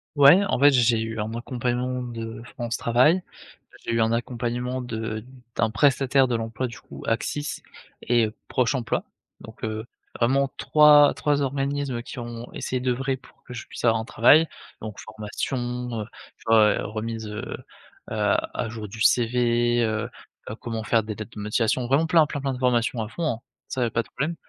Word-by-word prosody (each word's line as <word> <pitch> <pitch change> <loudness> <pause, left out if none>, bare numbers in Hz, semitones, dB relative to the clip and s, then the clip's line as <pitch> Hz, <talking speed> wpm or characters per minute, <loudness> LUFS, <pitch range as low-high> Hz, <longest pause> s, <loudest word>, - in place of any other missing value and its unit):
Ouais, 145 +7 +7
en 190 - 0
fait, 145 +2 +7
j'ai 120 -3 +3
eu 110 0 -4
un 105 +1 -2
accompagnement 125 +1 -2
de 115 -2 -6
France 120 -1 -3
Travail, 130 +10 +3 0.6
j'ai - - -2
eu 115 - +2
un 110 0 +2
accompagnement 120 +2 -2
de 110 -3 -4 0.3
d'un 115 - +2
prestataire 135 +1 +3
de 120 - 0
l'emploi 115 +2 -3
du 115 - -10
coup - - -11
Axis 145 +6 -2 0.4
et 120 -2 +3 0.2
Proche 125 0 +1
Emploi, 125 -3 -1 0.4
Donc - - -13
heu, 110 0 -3 0.3
vraiment 135 +3 +2
3- 150 -1 +6
3 145 -1 +1
organismes 140 -2 -2
qui - - -9
ont 120 0 -7
essayé 130 - -3
d'œuvrer 130 +2 0
pour - - -22
que 125 - -9
je 120 - -7
puisse - - -5
avoir 115 -1 +4
un - - -7
travail, 155 +6 +5 0.3
donc 110 -2 -7
formation, 110 +5 -4 0.4
heu, - - -4 0.3
tu - - -20
vois, 110 -2 +5
remise, 110 +1 -4
heu 105 0 -5 0.7
heu, 105 -2 +2 0.2
à 115 - -2
jour 110 -1 -6
du 110 +3 -9
CV, 120 0 +3
heu 110 +1 -1 0.4
heu, 105 - -5
comment 115 -2 -5
faire 110 +1 +2
des 110 0 -4
lettres 110 +2 -8
de - - -4
motivation, 110 +3 0
vraiment 140 +6 +3
plein, 160 -1 +5
plein, 145 -1 -4
plein 135 -1 -1
de 125 - -6
formations 120 -2 +1
à - - -5
fond, 165 +6 -3
hein, 115 - -8 0.3
ça 130 - -1
y - - +3
a 115 - -2
pas 115 - +1
de - - -21
problème. 150 +6 -2
120 Hz, 190 wpm, -25 LUFS, 115-130 Hz, 0.7 s, Ouais